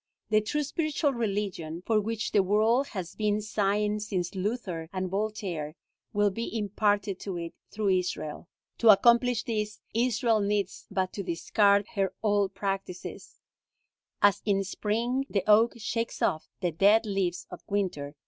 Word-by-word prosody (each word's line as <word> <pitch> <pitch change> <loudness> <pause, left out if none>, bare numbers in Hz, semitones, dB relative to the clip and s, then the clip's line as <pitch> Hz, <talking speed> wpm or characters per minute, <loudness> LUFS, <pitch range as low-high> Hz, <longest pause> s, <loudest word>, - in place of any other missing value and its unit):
The 215 0 +5
true 295 +8 -1
spiritual 300 -1 0
religion, 195 -7 -3
for 220 -2 +3
which 220 +1 -3
the 205 - +4
world 220 +7 +2
has 185 -4 -6
been 210 -1 0
sighing 210 0 0
since 190 -4 -3
Luther 190 -5 -3
and 185 -1 -3
Voltaire, 195 -7 -3 0.4
will 205 -1 +2
be 230 +3 -4
imparted 205 -2 0
to 190 -3 -5
it 170 -1 -5 0.2
through 210 -2 -1
Israel. 180 -4 -1 0.3
To 230 - +5
accomplish 235 +2 +5
this, 215 -2 -3
Israel 230 -1 +2
needs 200 -2 -1
but 190 -2 -1
to 200 - -4
discard 200 +3 +2
her 195 -2 -1
old 205 -2 +1
practices, 195 -2 -5 0.9
as 205 0 +5
in 195 -2 +1
spring 235 +7 -1
the 200 - 0
oak 215 +2 +5
shakes 230 +1 -3
off 155 - 0
the 175 -2 +1
dead 205 +7 +4
leaves 195 -4 -1
of 180 - -8
winter. 175 -8 -2
205 Hz, 150 wpm, -28 LUFS, 190-220 Hz, 0.9 s, The